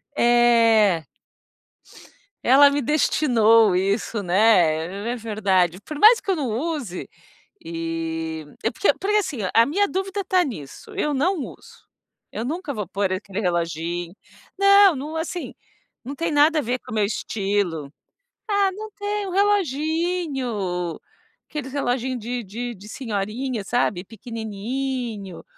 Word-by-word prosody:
É. 230 - +4 1.4
Ela 280 +3 +7
me 285 0 -1
destinou 230 -7 +4
isso, 200 +4 0
né, 185 0 +2
é - - -3
verdade. 195 -6 0
Por 295 +9 -8
mais 440 +8 +7
que - - -9
eu 380 - +3
não 285 -7 -2
use, 250 - -3 0.6
e 165 -1 -4 0.2
é 225 - +1
porque 385 - +2
porque, 415 +2 0
assim, 345 - -1 0.2
a 230 +1 +6
minha 400 +8 +1
dúvida 385 +2 -3
está 370 -1 +2
nisso, 235 - -8
eu 345 -7 -1
não 335 +8 +1
uso, 280 - -10 0.5
eu 220 - -3
nunca 300 +3 -4
vou 210 -3 -4
pôr 195 +1 -1
aquele 195 +1 -5
reloginho, 170 -2 -2 0.5
não, 395 -1 +7
não, 295 +3 -6
assim, 330 +2 -4 0.5
não 265 +4 -6
tem 330 +1 -2
nada 305 +2 +4
a - - +1
ver 250 0 -2
com - - -13
o 220 - -4
meu 210 - +2
estilo. 195 -7 -2 0.6
Ah, 405 -2 +2
não 430 +3 -8
tem 410 0 -3
um - - -5
reloginho, 305 - -1 0.5
aqueles 285 -3 -5
reloginho 255 -2 -1
de 240 +2 -4
de 235 +4 -6
de 205 +1 -13
senhorinha, 225 +1 -3
sabe, 200 -4 0
pequenininho. 225 -1 -5
240 Hz, 135 wpm, -23 LUFS, 195-305 Hz, 1.4 s, Ela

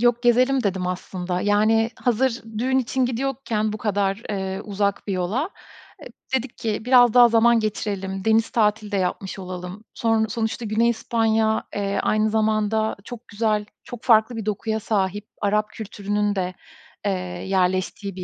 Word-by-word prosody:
yok 240 0 +3
"Gezelim." 255 +2 +3
dedim 190 -3 -1
aslında. 180 0 -3
Yani, 220 +2 +3
hazır 245 0 0 0.2
düğün 260 +3 +2
için 260 +1 0
gidiyorken 235 -4 -2
bu 215 - -5
kadar, 200 0 0
eee, 190 -1 -3
uzak 200 0 -1
bir 200 - -2
yola, 205 - -1 0.8
e, 265 - +5
dedik 250 -1 -7
ki, 220 0 -3
"Biraz 245 -2 +6
daha 245 -1 +8
zaman 235 0 +4
geçirelim, 195 -3 -3
deniz 225 0 +3
tatili 215 -3 +1
de 200 - 0
yapmış 190 +1 -2
olalım." 185 +2 -7
Sonr 225 -1 +1
sonuçta 220 +1 -3
Güney 220 +3 +2
İspanya, 225 -1 +1
eee, 200 -1 -1
aynı 215 0 +2
zamanda 220 0 +1
çok 240 +1 -10
güzel, 210 -1 0 0.2
çok 245 -2 -9
farklı 225 0 +4
bir 220 -2 -5
dokuya 220 +1 -1
sahip. 205 -1 -1
Arap 210 +1 +1
kültürünün 205 -1 -2
de, 185 -1 -2 0.5
eee, 200 - +2 0.4
yerleştiği 185 +1 0
bir 185 - -6
215 Hz, 155 wpm, -23 LUFS, 200-230 Hz, 0.8 s, daha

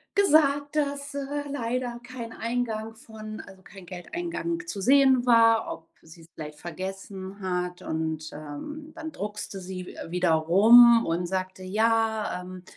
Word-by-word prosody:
gesagt, 290 -6 +3
dass, 285 -1 -1
äh, 285 +1 -3
leider 245 -2 -3
kein 240 -2 -8
Eingang 225 -2 -3
von 215 -1 -9
also, 190 0 -14
kein 195 -2 -13
Geldeingang 335 - -4
zu 200 - -5
sehen 265 0 +5
war, 230 -1 +5
ob 165 0 -9
sie 165 +1 -15
es 160 - -16
vielleicht 150 -1 -8
vergessen 190 +2 -7
hat. 180 -1 -3
Und, 160 0 -3
ähm, 225 - -8
dann 320 -1 -6
druckste 210 -3 -6
sie 185 0 -6
w-wieder 180 0 -2
rum 230 +9 +7
und 170 +1 -1
sagte: 185 0 -3
„Ja, 220 0 +1
ähm, 180 0 -10
215 Hz, 140 wpm, -26 LUFS, 180-255 Hz, -, rum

